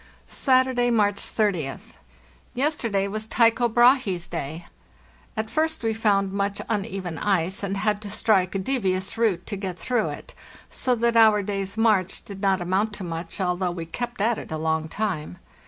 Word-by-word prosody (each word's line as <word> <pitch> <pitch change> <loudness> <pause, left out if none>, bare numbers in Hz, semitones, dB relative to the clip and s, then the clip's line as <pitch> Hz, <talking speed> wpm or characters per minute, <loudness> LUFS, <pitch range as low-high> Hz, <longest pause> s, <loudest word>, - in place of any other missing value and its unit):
"Saturday, 255 -2 +2
March 205 -3 +2
30th. 180 -14 -2 0.6
Yesterday 240 -8 0
was 215 +2 -4
Tycho 235 +1 +3
Brahe's 240 -7 +3
day. 165 +1 -5 0.7
At 220 0 -3
first 315 -3 0
we 225 -1 +1
found 200 -3 +1
much 200 0 -1
uneven 195 -6 -3
ice, 190 +1 0
and 200 -1 -2
had 210 0 0
to 210 - -6
strike 200 -3 +2
a - - +2
devious 190 -3 -1
route 225 -6 +1
to 210 - -4
get 190 -3 -5
through 245 -3 0
it, - - -9 0.4
so 250 -1 +1
that 235 0 +1
our 215 -2 +6
day's 195 0 -3
march 210 -5 +1
did 195 -1 -9
not 195 -2 +2
amount 190 +5 0
to 205 - -6
much, 165 +1 -5
although 180 -1 0
we 175 -1 -5
kept 240 +6 -5
at 225 +1 +2
it - - -10
a 160 - -2
long 160 0 -1
time. 180 -6 -3
200 Hz, 170 wpm, -24 LUFS, 185-225 Hz, 0.7 s, our